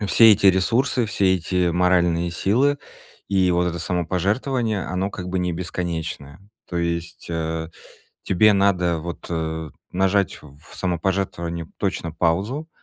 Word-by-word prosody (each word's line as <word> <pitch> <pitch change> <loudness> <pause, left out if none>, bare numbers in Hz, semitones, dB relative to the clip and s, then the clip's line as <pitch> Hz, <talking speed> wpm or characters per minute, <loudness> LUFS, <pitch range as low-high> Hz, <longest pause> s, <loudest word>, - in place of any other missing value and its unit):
И 105 - -2
все 115 +2 +7
эти 100 0 +3
ресурсы, 115 +6 +3
все 95 -2 +2
эти 90 0 0
моральные 85 -1 +2
силы 130 +11 +2 0.5
и 95 -2 +3
вот 90 0 +2
это 85 0 -4
самопожертвование, 100 - -1
оно, 95 +2 -2
как 90 -2 -6
бы, 95 +1 -1
не 90 -1 -1
бесконечное. 80 -3 -4 0.3
То 90 - -4
есть, 85 -1 -3
э, 80 -1 -2 0.6
тебе 105 +3 +4
надо, 90 -4 +2
вот, 85 +2 -7
э, 80 -1 -3 0.2
нажать 95 +1 +1
в 70 -1 -15 0.2
самопожертвовании 85 -2 -2
точно 85 - -2
паузу 95 - -1
90 Hz, 135 wpm, -22 LUFS, 85-100 Hz, 0.6 s, все